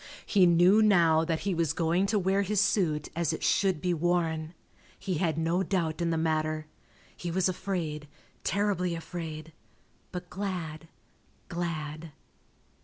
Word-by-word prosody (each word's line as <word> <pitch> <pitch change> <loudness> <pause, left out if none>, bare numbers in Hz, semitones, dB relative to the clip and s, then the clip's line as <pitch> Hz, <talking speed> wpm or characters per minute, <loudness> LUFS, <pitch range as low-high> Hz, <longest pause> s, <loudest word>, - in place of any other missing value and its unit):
He 190 -4 +4
knew 175 +5 +5
now 170 -7 +5
that 165 -1 -1
he 195 -1 -1
was 165 -3 0
going 175 +3 +1
to 210 +1 +1
wear 195 +1 +2
his 205 +1 0
suit 170 -7 +1
as 170 -2 0
it - - -5
should 190 -5 +2
be 180 +3 0
worn. 165 -1 0 0.4
He 185 -5 -3
had 165 -4 0
no 165 +3 +1
doubt 175 -4 -1
in 170 - +1
the 165 - 0
matter. 155 -1 0 0.5
He 175 - -5
was 180 +2 +1
afraid, 175 -5 -3 0.4
terribly 190 -4 0
afraid, 160 -2 -7 0.6
but 180 -1 -6
glad, 175 -5 -5 0.6
glad. 160 -2 -4
170 Hz, 145 wpm, -29 LUFS, 160-185 Hz, 0.6 s, knew